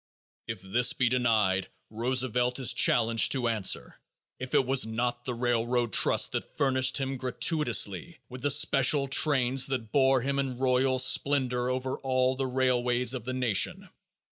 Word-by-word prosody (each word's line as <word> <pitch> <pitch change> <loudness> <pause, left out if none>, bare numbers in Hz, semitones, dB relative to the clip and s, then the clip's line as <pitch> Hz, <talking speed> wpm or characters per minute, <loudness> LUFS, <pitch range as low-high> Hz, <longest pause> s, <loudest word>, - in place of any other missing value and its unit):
If 110 -5 -7
this 120 +6 +1
be 125 -2 0
denied, 110 -7 0 0.2
Roosevelt 125 +1 -2
is 130 -3 +2
challenged 115 -1 +2
to 130 -3 -1
answer 110 -5 -2 0.4
if 130 0 -5
it 135 - +2
was 130 +1 +3
not 120 +2 -3
the 125 - -4
railroad 120 0 -1
trust - - +3
that - - -6
furnished 130 -3 +1
him 135 -1 -4
gratuitously 125 - -1
with 125 0 -11
the 145 - -1
special 140 -1 +2
trains 135 -2 +2
that 125 -5 -5
bore 135 -2 +2
him 140 +2 -2
in 130 -3 -4
royal 130 0 0
splendor 130 -1 +1
over 130 +1 -4
all 130 -1 -1
the 135 0 -3
railways 125 -1 0
of 125 -4 -7
the 130 - -4
nation. 125 -5 -1
125 Hz, 155 wpm, -27 LUFS, 120-130 Hz, 0.4 s, was